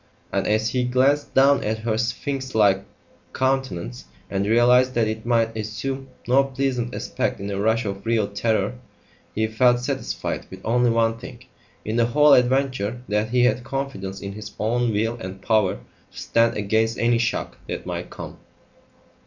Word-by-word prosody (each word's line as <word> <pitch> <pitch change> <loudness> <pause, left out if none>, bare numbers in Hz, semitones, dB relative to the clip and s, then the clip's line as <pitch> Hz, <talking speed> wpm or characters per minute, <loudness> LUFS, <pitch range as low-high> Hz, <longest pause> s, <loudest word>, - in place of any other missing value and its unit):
And, - - 0
as 110 +1 +1
he 125 0 0
glanced 130 +4 +1
down 140 +1 +5
at 110 +1 -1
her 110 0 -1
sphinx 130 +3 -3
like 100 -3 +3 0.5
countenance 130 - -2 0.3
and 100 0 0
realised 125 +3 +4
that 115 -2 +2
it 110 +1 -4
might 115 -2 +2
assume 130 +5 -4 0.2
no 130 +3 +5
pleasant 130 -3 -2
aspect - - -2
in 100 +1 -4
a 100 - -3
rush 110 +3 +1
of 100 -1 -4
real 115 -2 +1
terror, 110 +3 -1 0.6
he 110 - +1
felt 120 +3 +3
satisfied 135 +2 -3
with 95 - -10
only 120 +1 +3
one 115 0 +1
thing 120 +2 -11 0.4
in 110 +2 -2
the 115 -1 +3
whole 150 +4 +5
adventure 125 -3 +1
that 105 +1 0
he 125 +1 +3
had 125 0 +2
confidence 130 -9 -4
in 100 - -5
his 105 +1 -8
own 120 +2 +1
will 115 +3 -1
and 95 0 -8
power 105 -4 +2
to - - -20
stand 115 -1 +1
against 110 +2 +1
any 120 0 +2
shock 115 -1 -2
that - - -5
might - - -5
come. - - -9
115 Hz, 170 wpm, -23 LUFS, 105-125 Hz, 0.6 s, down